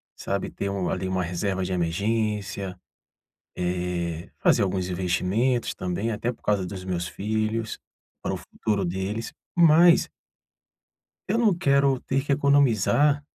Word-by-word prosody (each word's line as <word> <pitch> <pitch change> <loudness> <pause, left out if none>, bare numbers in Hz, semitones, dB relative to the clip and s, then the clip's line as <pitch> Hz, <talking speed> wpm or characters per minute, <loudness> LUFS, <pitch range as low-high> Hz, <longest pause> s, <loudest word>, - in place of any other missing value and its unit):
sabe? 100 0 -3
Ter 100 - -4
um 100 -2 -2
ali, 95 0 -2
uma 95 -1 0
reserva 95 +2 -2
de 90 0 -2
emergência. 100 +1 -1 0.8
Eh, 90 -2 -2
fazer - - +4
alguns 95 -1 -1
investimentos 95 +7 0
também, 95 +5 -2
até 115 +3 -1
por - - -24
causa 100 -3 +1
dos 95 0 -7
meus 90 -2 -2
filhos. 110 +3 -2 0.4
Para - - -2
o - - -2
futuro 105 -3 -2
deles. 95 +5 -3 0.2
Mas 170 0 +6 1.2
eu - - +1
não 225 -5 +4
quero 140 -4 +2
ter 135 0 -1
que 145 - -2
economizar, 140 +1 +3
100 Hz, 135 wpm, -25 LUFS, 90-125 Hz, 1.2 s, Mas